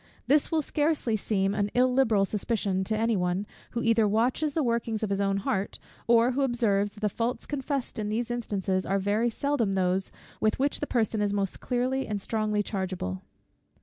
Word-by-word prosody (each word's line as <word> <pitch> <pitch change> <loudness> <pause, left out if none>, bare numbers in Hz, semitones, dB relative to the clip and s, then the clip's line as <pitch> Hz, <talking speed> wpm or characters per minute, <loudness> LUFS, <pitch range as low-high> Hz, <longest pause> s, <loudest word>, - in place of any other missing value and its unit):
This 295 +4 +3
will 315 -2 +2
scarcely 295 -6 0
seem 195 -2 0
an 205 0 0
illiberal 250 -5 +3
suspicion 200 -2 -1
to 215 +2 -1
any 225 +1 +2
one, 180 +1 0 0.3
who 235 - -1
either 230 -2 +4
watches 245 +8 +1
the 315 - +2
workings 235 -2 -1
of 210 - -1
his 200 0 0
own 195 0 +1
heart, 195 0 -2 0.3
or 235 +1 +5
who 270 +3 -1
observes, 220 -6 +1
that 210 - -14
the 210 - +2
faults 230 +4 -2
confessed 275 -3 -3
in 210 -1 -2
these 235 +3 -1
instances 195 -5 -1
are 195 - 0
very 205 +4 +1
seldom 240 -4 0
those, 190 0 0 0.3
with 215 - +1
which 275 +2 0
the 295 - -3
person 220 -3 0
is 205 -1 +1
most 195 -2 -1
clearly 255 +2 -1
and 210 -1 -2
strongly 210 0 0
chargeable. 185 - -3
220 Hz, 185 wpm, -28 LUFS, 200-245 Hz, 0.3 s, or